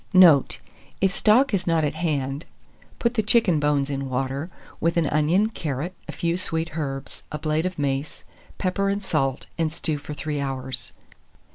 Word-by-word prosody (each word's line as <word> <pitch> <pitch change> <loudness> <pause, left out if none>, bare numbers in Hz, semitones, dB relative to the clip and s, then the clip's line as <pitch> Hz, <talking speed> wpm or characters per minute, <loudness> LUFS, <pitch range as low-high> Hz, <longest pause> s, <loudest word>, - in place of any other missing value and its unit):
Note. 170 -7 +7 0.4
If 195 -1 +3
stock 235 +6 +4
is 190 -3 0
not 165 -2 +3
at 145 - -1
hand, 145 -3 -2 0.5
put 235 0 +1
the 230 - +2
chicken 210 -6 +3
bones 145 -2 +2
in 140 -1 -3
water, 135 +5 -2 0.3
with 170 +1 +1
an 170 - +3
onion, 155 +9 +2
carrot, 155 - -3
a - - -4
few 170 -1 -1
sweet 165 -3 -1
herbs, 135 -4 -4
a 150 - -2
blade 155 +3 0
of 185 - -6
mace, 140 0 -2 0.3
pepper 195 +1 0
and 200 +1 -1
salt, 135 -7 0
and 160 -2 +1
stew 155 -2 -2
for 150 +1 -7
3 150 -1 -3
hours. 130 -3 -4
155 Hz, 170 wpm, -24 LUFS, 140-185 Hz, 0.5 s, Note